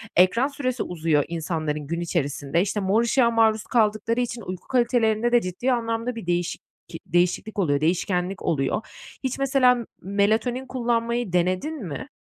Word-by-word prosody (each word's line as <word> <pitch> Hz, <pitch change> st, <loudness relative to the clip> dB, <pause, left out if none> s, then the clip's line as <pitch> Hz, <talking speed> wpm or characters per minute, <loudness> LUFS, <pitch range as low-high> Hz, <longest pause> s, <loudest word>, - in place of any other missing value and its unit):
ekran 185 Hz, +9 st, +4 dB
süresi 255 Hz, -3 st, -2 dB
uzuyor 160 Hz, -4 st, +1 dB
insanların 155 Hz, -3 st, -3 dB
gün 170 Hz, +1 st, -2 dB
içerisinde. 150 Hz, -2 st, -1 dB
İşte, 200 Hz, +2 st, -1 dB
mor 200 Hz, +3 st, +2 dB
ışığa 235 Hz, 0 st, +3 dB
maruz 220 Hz, -1 st, +3 dB
kaldıkları 220 Hz, 0 st, +1 dB
için 240 Hz, -1 st, -3 dB
uyku 185 Hz, -3 st, -7 dB
kalitelerinde 240 Hz, -2 st, +2 dB
de 240 Hz, -, +5 dB
ciddi 185 Hz, +8 st, -2 dB
anlamda 230 Hz, 0 st, -1 dB
bir 230 Hz, -, -7 dB
değişik 175 Hz, 0 st, -1 dB, 0.3 s
ki 165 Hz, -, -8 dB
değişiklik 180 Hz, +5 st, 0 dB
oluyor, 145 Hz, -6 st, +1 dB
değişkenlik 180 Hz, +2 st, 0 dB
oluyor. 140 Hz, +7 st, 0 dB, 0.4 s
Hiç 260 Hz, 0 st, -2 dB
mesela 265 Hz, -2 st, +4 dB
m 240 Hz, -1 st, -5 dB, 0.2 s
melatonin 220 Hz, +6 st, 0 dB
kullanmayı 235 Hz, -4 st, -1 dB
denedin 185 Hz, -, 0 dB
mi? 165 Hz, -, -6 dB
215 Hz, 150 wpm, -24 LUFS, 175-240 Hz, 0.4 s, de